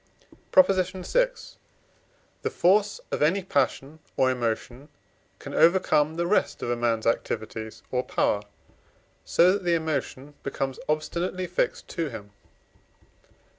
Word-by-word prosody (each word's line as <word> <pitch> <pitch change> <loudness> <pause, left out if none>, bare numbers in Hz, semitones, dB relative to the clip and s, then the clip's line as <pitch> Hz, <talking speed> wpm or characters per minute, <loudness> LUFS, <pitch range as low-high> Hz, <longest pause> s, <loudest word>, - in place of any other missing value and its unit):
PROP. 280 - +8
VI. 190 - +1 1.1
The - - -1
force 200 +4 +2
of - - -2
any 175 +6 +2
passion 145 -1 -1 0.2
or 130 -1 +4
emotion 125 +3 -3 0.5
can - - -9
overcome 160 -3 +3
the 170 +1 -1
rest 195 +5 +1
of 120 - -1
a - - +1
man's 115 -2 0
activities 110 -1 -3
or 125 - +1
power, 105 -4 0 0.8
so 180 +2 +4
that 200 0 -1
the 175 -1 +2
emotion 150 -3 -3
becomes 135 -1 -3
obstinately 170 +4 -1
fixed - - -2
to 165 -3 -2
him. 105 -4 -9
155 Hz, 125 wpm, -26 LUFS, 125-185 Hz, 1.1 s, PROP